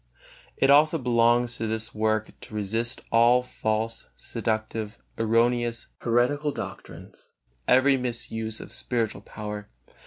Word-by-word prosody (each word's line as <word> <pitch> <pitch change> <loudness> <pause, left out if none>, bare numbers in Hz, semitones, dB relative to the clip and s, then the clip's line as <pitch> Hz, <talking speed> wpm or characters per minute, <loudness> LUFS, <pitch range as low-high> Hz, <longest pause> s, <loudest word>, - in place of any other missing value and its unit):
It 135 - +4
also 155 +3 +6
belongs 120 -1 +2
to 110 - -2
this 110 0 -3
work 110 0 0
to 110 - -10
resist 115 +4 -1
all 120 +2 +5
false, 115 -1 -2
seductive, 110 0 -3 0.2
erroneous, 115 +1 +1
heretical 125 +5 +1
doctrines, - - -9 0.4
every 135 +2 +5
misuse 115 -3 -3
of - - -9
spiritual 115 -3 -2
power. 105 -1 -7
115 Hz, 115 wpm, -26 LUFS, 110-125 Hz, 0.4 s, also